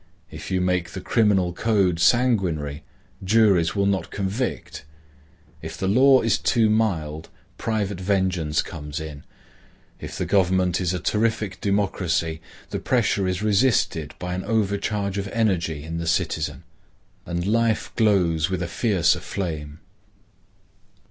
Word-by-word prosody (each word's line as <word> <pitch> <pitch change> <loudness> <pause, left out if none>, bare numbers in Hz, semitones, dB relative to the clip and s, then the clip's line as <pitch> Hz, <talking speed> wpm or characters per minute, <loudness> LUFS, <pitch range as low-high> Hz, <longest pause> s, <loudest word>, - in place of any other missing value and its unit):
If - - -8
you 95 -1 0
make 90 -2 0
the - - -5
criminal 95 -4 +2
code 95 -4 +1
sanguinary, 90 - +2 0.4
juries 95 -4 +3
will 100 -1 +1
not 95 -4 0
convict. 100 - -3 0.8
If 80 0 -7
the 95 - -2
law 130 +6 +5
is 115 -2 +2
too 110 -3 +2
mild, 80 -8 -1 0.3
private 105 -4 -2
vengeance 95 -5 0
comes 75 -1 -6
in. 75 -2 -8 0.8
If - - -7
the - - -2
government 95 -2 +2
is 90 -1 0
a - - -2
terrific 105 -3 -1
democracy, 90 -5 0 0.3
the - - -2
pressure 95 -2 +1
is 95 +2 -2
resisted 105 - +1
by 90 0 -4
an 95 +1 -3
over 105 -2 0
charge 100 -1 -2
of 100 - -3
energy 90 -9 -1
in 85 +1 -5
the 85 - -4
citizen, 80 - -1 0.6
and 85 0 -2
life 115 +1 +1
glows 90 -7 +2
with 95 -1 -2
a - - -3
fiercer 95 -2 +1
flame. 80 -4 -5
95 Hz, 135 wpm, -23 LUFS, 85-105 Hz, 0.8 s, law